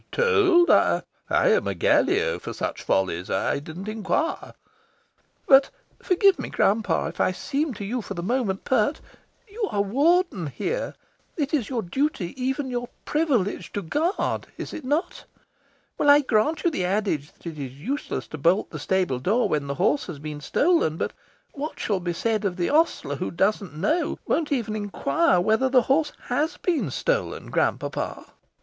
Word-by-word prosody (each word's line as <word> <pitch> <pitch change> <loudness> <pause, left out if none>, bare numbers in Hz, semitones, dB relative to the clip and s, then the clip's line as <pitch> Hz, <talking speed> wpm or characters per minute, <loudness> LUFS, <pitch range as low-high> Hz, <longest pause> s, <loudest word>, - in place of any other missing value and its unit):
"Told? 405 -7 +4
I - - +4 0.3
am 480 -1 +3
a - - -1
Gallio 440 +6 +2
for - - -6
such - - -4
follies. 90 -2 0
I - - 0
didn't 165 +7 -8
inquire." 225 - -2 0.9
"But 270 -1 +6 0.3
(forgive 380 0 +3
me, - - -4
grand 210 +2 +2
papa, - - 0
if - - -4
I - - +3
seem 275 - -2
to 200 0 -6
you, 240 +4 -2
for 200 - -7
the 170 - -4
moment, 215 -3 -1
pert) 260 +4 +1 0.5
you 435 +3 -6
are 200 - +1
Warden 280 - +2
here. 470 - -3 0.4
It 295 -2 -2
is 270 -8 0
your 240 -4 -2
duty, 195 - -1
even 265 +1 -1
your 245 0 -3 0.2
privilege, 275 - 0
to 205 - -3
GUARD. 320 - -1
Is - - -6
it 310 - -6
not? 295 +7 -2 0.7
Well, 290 - +3
I 290 +1 +8
grant 255 +4 +1
you 345 - +2
the 185 - -2
adage 180 -6 -1
that - - -25
it 160 -3 -6
is 130 -3 -5
useless 275 - -3
to 155 - -7
bolt 170 +8 +2
the 155 - -6
stable 180 -5 0
door 215 - +2
when 145 -2 -1
the 140 - -3
horse 190 - +1
has 175 -5 -6
been 150 0 -7
stolen. 285 - +2
But - - -2 0.4
what 295 +2 -5
shall 200 -3 0
be 175 -1 -2
said 220 +4 -1
of 190 -3 -1
the 175 -1 -1
ostler 300 - +1
who 180 - -3
doesn't 195 -3 0
know 310 - 0
won't 315 -3 0
even 230 -6 -1
'inquire' 180 -5 +1
whether 220 +8 +2
the 255 -2 +4
horse 295 +4 +2
HAS 295 +7 -1
been 295 - 0
stolen, - - -2
grand - - +1
papa?" - - -4
225 Hz, 175 wpm, -25 LUFS, 180-300 Hz, 0.9 s, I